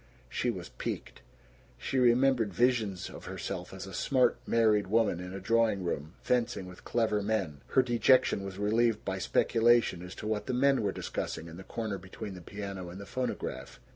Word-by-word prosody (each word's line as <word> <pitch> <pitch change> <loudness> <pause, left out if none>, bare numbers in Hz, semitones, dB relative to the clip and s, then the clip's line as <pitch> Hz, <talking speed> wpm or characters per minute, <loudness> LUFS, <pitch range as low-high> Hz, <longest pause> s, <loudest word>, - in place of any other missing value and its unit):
She - - -1
was - - -4
piqued. - - -5 0.6
She 130 - -1
remembered 125 -2 +4
visions 110 -3 +1
of - - -10
herself - - -5
as - - -7
a - - -9
smart 125 -3 +2
married 110 -3 +3
woman 105 -4 +2
in 90 0 -6
a 95 - -5
drawing 110 -1 +2
room, 80 -1 -3
fencing 120 -5 0
with 90 0 -12
clever 110 -3 +1
men. 100 -9 -1
Her 130 - +4
dejection 125 -2 +3
was 95 -1 -6
relieved 110 +2 +2
by 95 0 -2
speculation 115 -1 +3
as 90 +1 -8
to - - -8
what 105 -1 -2
the 125 - 0
men 135 +1 +4
were 100 -2 0
discussing, 80 - -4
in 85 0 -10
the 95 - -9
corner 105 -1 -4
between 95 +2 -8
the 90 - -9
piano 100 -1 -6
and 90 +2 -9
the 100 - -7
phonograph. 125 +4 -4
105 Hz, 185 wpm, -30 LUFS, 95-120 Hz, 0.6 s, remembered